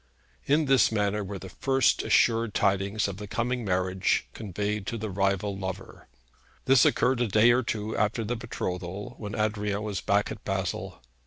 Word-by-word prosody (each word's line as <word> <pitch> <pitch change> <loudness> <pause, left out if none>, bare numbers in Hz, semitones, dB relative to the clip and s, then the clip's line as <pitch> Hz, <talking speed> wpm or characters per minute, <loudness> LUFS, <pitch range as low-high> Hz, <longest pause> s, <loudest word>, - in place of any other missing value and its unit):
In 150 +2 +3
this 135 -4 +4
manner 105 -1 0
were 100 +1 -6
the 95 - -9
first 135 +7 +2
assured 115 -2 +2
tidings 100 +2 +1
of 100 -2 -6
the 105 0 -7
coming 120 +3 -2
marriage 95 -1 0
conveyed 105 0 -3
to 115 - -2
the 110 -2 -4
rival 100 +1 0
lover. 95 0 -7 0.6
This 130 -1 +5
occurred 125 0 +2
a 120 - +2
day 110 +3 +5
or 125 +2 +3
two 110 -2 -3
after 105 +3 0
the 120 +3 -2
betrothal, 95 -3 -5
when 105 -2 -5
Adrian 105 -1 -1
was 105 -3 -3
back 100 +1 +1
at 110 -1 -8
Basle. 95 -4 -3
105 Hz, 170 wpm, -27 LUFS, 95-115 Hz, 0.6 s, This